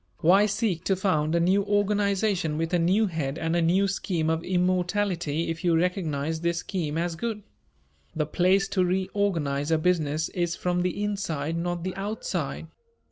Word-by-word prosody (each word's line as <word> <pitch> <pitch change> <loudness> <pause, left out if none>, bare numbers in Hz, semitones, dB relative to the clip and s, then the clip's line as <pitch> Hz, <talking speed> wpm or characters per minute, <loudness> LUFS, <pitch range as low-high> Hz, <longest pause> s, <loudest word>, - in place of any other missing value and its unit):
Why 195 +6 +5
seek 200 -5 -1
to 195 - +2
found 170 -5 +1
a - - +3
new 185 +4 +3
organization 200 -4 +1
with 165 +2 -2
a 175 - +3
new 190 +6 +3
head 160 -6 -3
and 165 +1 -1
a 170 - +2
new 185 +4 +3
scheme 170 -4 -1
of 160 +1 -1
immortality 180 -3 0
if 165 - -6
you 170 -2 +3
recognize 160 -3 -1
this 170 0 0
scheme 165 -3 -3
as 170 0 -1
good? 215 +2 -4 0.7
The 155 -1 0
place 185 +5 +2
to 185 - +1
reorganize 180 -6 0
a 160 - +3
business 155 -2 0
is 175 -2 -1
from 180 0 -1
the 180 +3 -1
inside, 165 -7 -2
not 175 0 -2
the 185 0 -3
outside. 205 +3 -3
175 Hz, 170 wpm, -26 LUFS, 165-195 Hz, 0.7 s, Why